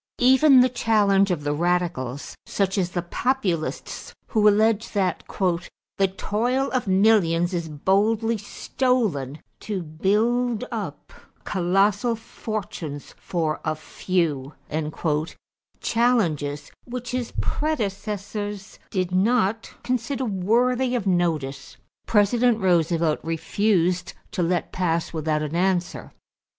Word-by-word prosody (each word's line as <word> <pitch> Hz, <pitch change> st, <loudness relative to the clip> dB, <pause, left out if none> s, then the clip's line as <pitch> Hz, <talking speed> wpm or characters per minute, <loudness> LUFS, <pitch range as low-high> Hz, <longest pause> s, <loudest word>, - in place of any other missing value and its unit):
= -, -, -68 dB
Even 265 Hz, +2 st, +6 dB
the 250 Hz, -, +5 dB
challenge 205 Hz, -5 st, +3 dB
of 170 Hz, -5 st, -1 dB
the 145 Hz, 0 st, 0 dB
radicals, 165 Hz, -6 st, -1 dB
such 195 Hz, -1 st, 0 dB
as 185 Hz, -4 st, 0 dB
the 175 Hz, -1 st, -3 dB
Populists, 185 Hz, -5 st, -2 dB
who 210 Hz, -1 st, +3 dB
alleged 215 Hz, +1 st, +3 dB
that 190 Hz, -2 st, 0 dB
"the 185 Hz, +1 st, -2 dB
toil 245 Hz, +6 st, 0 dB
of 255 Hz, -5 st, -1 dB
millions 190 Hz, -3 st, +3 dB
is 170 Hz, -2 st, -2 dB
boldly 210 Hz, +9 st, +1 dB
stolen 205 Hz, -, -1 dB, 0.2 s
to 200 Hz, -4 st, -4 dB
build 220 Hz, +9 st, +1 dB
up -, -, -6 dB, 0.3 s
colossal 200 Hz, +5 st, +1 dB
fortunes 190 Hz, -10 st, -6 dB
for 160 Hz, -3 st, -2 dB
a 155 Hz, -, -1 dB
few" 155 Hz, -4 st, -2 dB, 1.3 s
challenges 160 Hz, -, +1 dB
which 245 Hz, 0 st, -6 dB
his 250 Hz, -2 st, -2 dB
predecessors 205 Hz, -6 st, -3 dB
did 185 Hz, -2 st, -1 dB
not 220 Hz, +3 st, +1 dB
consider 255 Hz, +1 st, -1 dB
worthy 240 Hz, +6 st, +1 dB
of 235 Hz, -, -1 dB
notice 155 Hz, -7 st, -1 dB, 0.3 s
President 230 Hz, +3 st, +3 dB
Roosevelt 170 Hz, -4 st, +2 dB
refused 180 Hz, +2 st, 0 dB, 0.2 s
to 205 Hz, -4 st, -2 dB
let 175 Hz, 0 st, 0 dB
pass 170 Hz, -3 st, -1 dB
without 155 Hz, -1 st, -1 dB
an 150 Hz, +2 st, -4 dB
answer. 180 Hz, 0 st, 0 dB
195 Hz, 110 wpm, -24 LUFS, 170-225 Hz, 1.3 s, Even